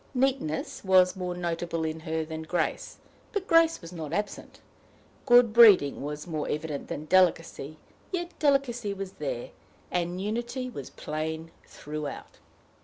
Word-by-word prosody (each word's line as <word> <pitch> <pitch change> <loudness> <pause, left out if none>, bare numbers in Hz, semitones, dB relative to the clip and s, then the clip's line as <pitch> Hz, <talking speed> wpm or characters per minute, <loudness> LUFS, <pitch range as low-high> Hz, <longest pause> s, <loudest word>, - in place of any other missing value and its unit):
Neatness 255 - -1
was 185 -1 +5
more 180 -1 -3
notable 170 -1 -2
in 160 0 -3
her 160 0 -2
than 160 0 -6
grace, 165 +3 -2 0.4
but 410 -3 -1
grace 330 -1 +4
was 165 +1 -10
not 160 -4 -6
absent; 205 0 -4 0.7
good 240 -3 +6
breeding 210 -12 +7
was 150 +1 -5
more 155 -4 -3
evident 150 -1 -3
than 150 - -5
delicacy, 165 -4 +2 0.3
yet 350 -2 -3
delicacy 245 -8 +1
was 195 -1 -5
there; - - -3 0.4
and 175 0 -1
unity 240 +5 -3
was 140 - -7
plain 160 +1 -5 0.2
throughout. 150 -1 -7
180 Hz, 135 wpm, -28 LUFS, 160-240 Hz, 0.7 s, breeding